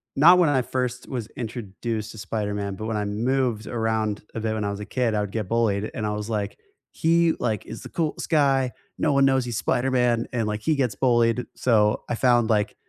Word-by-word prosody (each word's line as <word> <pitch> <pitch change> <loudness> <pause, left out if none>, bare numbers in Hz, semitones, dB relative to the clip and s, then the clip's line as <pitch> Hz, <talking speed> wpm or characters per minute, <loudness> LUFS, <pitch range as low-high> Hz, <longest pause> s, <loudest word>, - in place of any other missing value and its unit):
not 175 +6 +7
when 170 - +4
I 135 -3 +3
first 125 0 -3
was 120 -5 -4
introduced 110 -1 -4
to - - -12
Spider-Man, 105 -2 -3
but 110 - -6
when 110 - -1
I 105 - -1
moved 115 +1 0
around 110 -2 -1
a 115 - -4
bit 110 0 -1
when 110 - -2
I 100 - -1
was 100 - -5
a 105 - -5
kid, 120 -1 0
I 105 - +1
would 100 - -4
get 110 -3 -3
bullied, 110 -3 +1
and 110 - -3
I 105 - -1
was 105 +1 -4
like, 105 -2 -2 0.3
"He, 165 0 +3
like, 110 -4 -1
is - - -8
the - - -9
coolest 160 -3 -2
guy. 135 -4 +3 0.3
No - - +1
one 140 0 +4
knows 135 -1 +3
he's 120 -3 -3
Spider-Man, 125 -2 +1
and 115 -3 0
like 105 0 -3
he 155 - +1
gets 125 -7 0
bullied," 120 0 +2
so 105 -4 +2
I 120 - 0
found, 120 -2 +3
like 105 -1 +1
115 Hz, 225 wpm, -24 LUFS, 105-130 Hz, 0.3 s, not